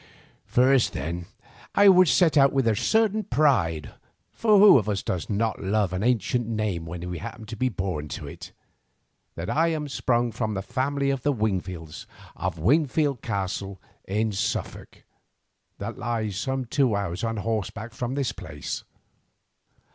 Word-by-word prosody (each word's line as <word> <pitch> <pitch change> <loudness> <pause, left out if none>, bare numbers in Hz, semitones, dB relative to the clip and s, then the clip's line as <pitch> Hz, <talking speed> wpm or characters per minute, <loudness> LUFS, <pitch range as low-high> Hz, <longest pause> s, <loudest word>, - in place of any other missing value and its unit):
First, 130 0 +3
then, 85 +1 -4 0.5
I 200 0 +6
would 185 -2 +7
set 160 +4 +4
out 140 -2 +6
with 135 -3 +1
a 110 - +3
certain 220 - +2
pride—for 125 - 0
who 200 -8 +8
of 105 - -4
us 100 -2 -1
does 90 -3 -3
not 110 +1 -1
love 100 -1 0
an 90 - -2
ancient 120 0 +1
name 105 -7 -2
when 85 +1 -6
we 90 -2 -4
happen 110 - -8
to 115 +2 -7
be 130 +4 0
born 90 -7 -3
to - - -6
it?—that 85 +1 -13
I 165 +2 +2
am 155 -3 -2
sprung 120 -3 0
from 110 -2 -2
the 95 - -3
family 140 +3 -1
of 135 -2 -2
the 145 - +1
Wingfields 95 - -3 0.3
of - - -3
Wingfield 140 - +2
Castle 95 0 -3 0.3
in 110 +3 0
Suffolk, 110 +3 -4 0.7
that - - -6
lies 110 -3 -2
some 130 +5 -2
two 125 -2 +1
hours 100 -2 -3
on 115 -1 -1
horseback 110 +1 -3
from 125 +3 -3
this 140 -3 0
place. 75 -1 -6
115 Hz, 155 wpm, -25 LUFS, 95-135 Hz, 0.7 s, who